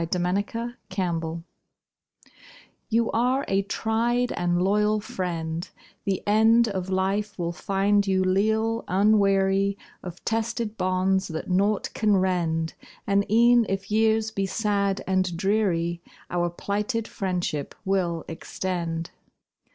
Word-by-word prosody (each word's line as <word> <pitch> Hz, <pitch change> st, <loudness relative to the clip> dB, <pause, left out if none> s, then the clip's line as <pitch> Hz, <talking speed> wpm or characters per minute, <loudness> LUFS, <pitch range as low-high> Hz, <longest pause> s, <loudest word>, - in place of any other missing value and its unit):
TO 180 Hz, -, 0 dB
MY 180 Hz, 0 st, 0 dB
SETTER, 230 Hz, +5 st, -3 dB
SCOUT 165 Hz, -3 st, -2 dB, 1.5 s
You 230 Hz, 0 st, +2 dB
are 250 Hz, +4 st, +1 dB
a 195 Hz, 0 st, +2 dB
tried 230 Hz, +4 st, 0 dB
and 175 Hz, 0 st, 0 dB
loyal 210 Hz, +3 st, +2 dB
friend; 170 Hz, -4 st, -4 dB, 0.4 s
The 195 Hz, -2 st, -1 dB
end 225 Hz, +3 st, +5 dB
Of 190 Hz, -3 st, -3 dB
life 195 Hz, +2 st, -1 dB
will 170 Hz, -2 st, -2 dB
find 200 Hz, +3 st, +1 dB
you 190 Hz, -1 st, +2 dB
leal, 220 Hz, +4 st, +1 dB
unweary 195 Hz, 0 st, +3 dB, 0.2 s
Of 180 Hz, -1 st, -9 dB
tested 225 Hz, -1 st, -1 dB
bonds 185 Hz, 0 st, +1 dB
that 160 Hz, +3 st, -5 dB
naught 200 Hz, +3 st, +1 dB
can 210 Hz, -2 st, +2 dB
rend, 170 Hz, -3 st, 0 dB, 0.3 s
And 200 Hz, 0 st, +1 dB
e'en 235 Hz, 0 st, +5 dB
if 195 Hz, +1 st, -3 dB
years 220 Hz, 0 st, +2 dB
be 195 Hz, -2 st, -1 dB
sad 200 Hz, -1 st, 0 dB
and 185 Hz, -2 st, 0 dB
dreary, 175 Hz, -4 st, 0 dB, 0.3 s
Our 175 Hz, 0 st, +1 dB
plighted 210 Hz, +6 st, -2 dB
friendship 180 Hz, -7 st, -3 dB
will 180 Hz, -4 st, 0 dB
extend. 165 Hz, 0 st, -4 dB
195 Hz, 120 wpm, -25 LUFS, 180-215 Hz, 1.5 s, end